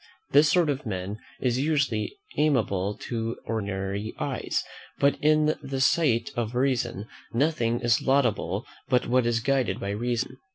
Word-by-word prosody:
This 145 +2 +6
sort 175 -3 +4
of 140 +1 -4
men 100 +1 -4 0.2
is 125 -1 +1
usually 140 - 0 0.2
amiable 105 -9 +1
to 115 -1 -3
ordinary 100 -1 -3
eyes; - - -1 0.3
but, 140 0 +3
in 155 0 +4
the 135 -1 -4
sight 130 -4 +2
of 120 0 -2
reason, 120 -5 0 0.3
nothing 120 -3 +1
is 120 -1 +3
laudable 120 -7 +1 0.2
but 125 -2 +3
what 125 0 +2
is 115 -1 +1
guided 135 0 +1
by 100 - -3
reason. 120 +4 -2
120 Hz, 140 wpm, -26 LUFS, 110-140 Hz, 0.3 s, This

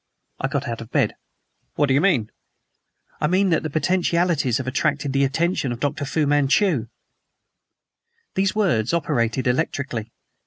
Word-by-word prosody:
I 135 - 0
got 140 0 -2
out 115 -1 -4
of 115 - -9
bed. - - +1 0.6
"What 145 - +3
do 135 - +1
you 140 - +3
mean?" 140 - +2 0.9
"I 150 - +1
mean 185 +3 +2
that 165 - +2
the 155 - -4
potentialities 170 -5 +1
have 130 - -4
attracted 140 +1 -1
the 140 0 +2
attention 145 0 0
of 120 - -5
Dr. 145 +1 -2
Fu 150 +2 0
Manchu!" 145 - +2 1.5
Those 190 +1 0
words 170 - +1
operated 130 -6 0
electrically. 125 -4 -1
145 Hz, 150 wpm, -22 LUFS, 130-170 Hz, 1.5 s, What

